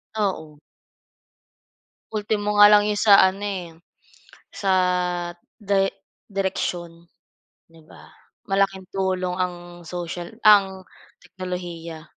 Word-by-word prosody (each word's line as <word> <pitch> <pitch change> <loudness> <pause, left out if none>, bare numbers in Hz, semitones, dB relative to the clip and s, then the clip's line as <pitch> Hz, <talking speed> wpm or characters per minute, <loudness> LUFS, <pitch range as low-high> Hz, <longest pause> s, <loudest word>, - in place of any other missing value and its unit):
Oo. 160 -8 -3 1.5
Ultimo 210 -1 -1
nga 205 - +10
lang 210 0 +6
yung 205 - -2
sa 205 -2 +7
ano 190 +1 +1
eh, 180 -4 -5 0.8
sa 195 -2 -2 0.8
day 200 -2 +1 0.4
direksion 175 -3 -4 0.6
'di 165 0 -18
ba? - - -16 0.4
Malaking 195 -1 0
tulong 185 -1 -2
ang 175 -1 -5
social 175 +3 -6
ang 195 -3 +5 0.4
teknolohiya. 175 -3 -7
190 Hz, 95 wpm, -23 LUFS, 175-200 Hz, 1.5 s, nga